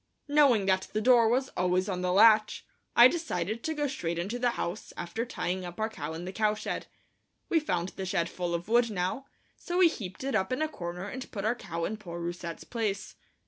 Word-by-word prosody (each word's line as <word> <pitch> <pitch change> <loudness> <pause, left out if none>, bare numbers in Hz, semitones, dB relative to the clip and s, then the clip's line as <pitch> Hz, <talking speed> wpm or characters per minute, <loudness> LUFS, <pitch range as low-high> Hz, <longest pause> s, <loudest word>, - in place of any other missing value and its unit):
Knowing 280 -8 +4
that 190 -1 +1
the 215 - +1
door 235 0 +5
was 260 +3 +1
always 180 +1 0
on 185 -3 -2
the 180 0 0
latch, 215 +2 +5 0.3
I 240 - +10
decided 230 - -2
to 320 -1 -2
go 295 -1 0
straight 170 -12 -3
into 200 +8 -3
the 245 0 +2
house, 175 +5 -4
after 195 +7 -3
tying 180 -4 -2
our 180 +5 -3
cow 150 -9 -6
up 160 - -5
in 170 +2 -6
the 185 - -4
cowshed. 215 0 -1 0.6
We 330 - +4
found 180 - -1
the 190 - -6
shed 170 -2 0
full 175 0 -3
of 170 +2 -5
wood 235 +1 +4
now, 200 +7 -2 0.3
so 350 - -3
we 365 -1 +7
heaped 195 - -7
it 270 0 -2
up 190 +3 +1
in 255 +5 0
a - - +1
corner, 180 - -6
and 255 +5 -7
put 205 -2 -4
our 220 - +3
cow 170 -8 -4
in 220 - -3
poor 175 -5 -7
Rousette's 170 0 -5
place. 210 -4 -3
205 Hz, 220 wpm, -29 LUFS, 180-240 Hz, 0.6 s, I